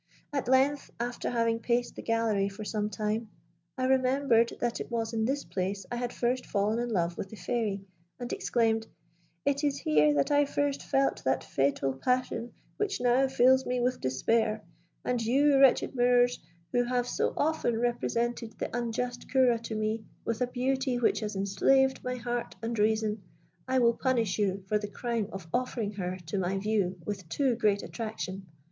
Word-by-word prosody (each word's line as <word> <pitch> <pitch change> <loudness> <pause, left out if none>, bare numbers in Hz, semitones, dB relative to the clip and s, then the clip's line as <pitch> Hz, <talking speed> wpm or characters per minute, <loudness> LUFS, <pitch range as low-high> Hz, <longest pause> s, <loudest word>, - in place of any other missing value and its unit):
At 275 -4 -1
length, 270 +3 +3
after 240 +1 -2
having 230 -1 +1
paced 240 +1 0
the - - -6
gallery 225 -4 +1
for 205 +2 -8
some 210 0 -1
time, 215 +2 -2 0.5
I 255 - 0
remembered 260 -2 +3
that 240 -1 -1
it - - -5
was 230 -1 -2
in 220 -1 +1
this 275 +3 -1
place 195 +1 -3
I - - -1
had 245 0 -2
first 250 +1 0
fallen 210 +2 0
in 240 0 -2
love 175 -5 -1
with 195 - -4
the 220 - -9
Fairy, 210 -4 -2 0.3
and 245 -1 -4
exclaimed, 225 -2 +1 0.6
'It 280 +1 +1
is 285 -2 +1
here 150 -1 +3
that 140 - +1
I 290 0 +4
first 285 0 -1
felt 270 0 0
that 130 0 +1
fatal 135 0 0
passion 240 - -1 0.3
which 405 -2 -1
now 250 +2 +3
fills 260 0 +4
me 250 0 0
with 250 +1 0
despair; 215 - +1 0.4
and 245 -2 0
you, 275 +4 +4
wretched 270 0 +5
mirrors, 245 0 +3 0.3
who 245 - +3
have 245 0 0
so - - -1
often 295 -7 +1
represented 240 -1 -1
the - - -4
unjust 245 +1 -3
Ceora 255 -4 +4
to 225 -1 -5
me, 215 +1 -1 0.2
with 230 +1 -2
a 250 - +2
beauty 260 +1 0
which 240 - +2
has 215 -1 -4
enslaved 265 +8 +2
my 250 0 -2
heart 240 0 -3
and 230 -1 -2
reason, 215 0 +1 0.5
I 260 0 +1
will 235 -2 +5
punish 230 -6 0
you 195 -1 0
for 210 +1 +1
the 210 - -4
crime 230 0 -2
of 195 -3 -7
offering 245 -4 -1
her 185 -3 -4
to 180 +5 -2
my 190 +1 0
view 195 -3 0
with 195 -5 -5
too 265 +6 +1
great 210 -3 +1
attraction.' 195 -4 -5
235 Hz, 180 wpm, -29 LUFS, 210-250 Hz, 0.6 s, wretched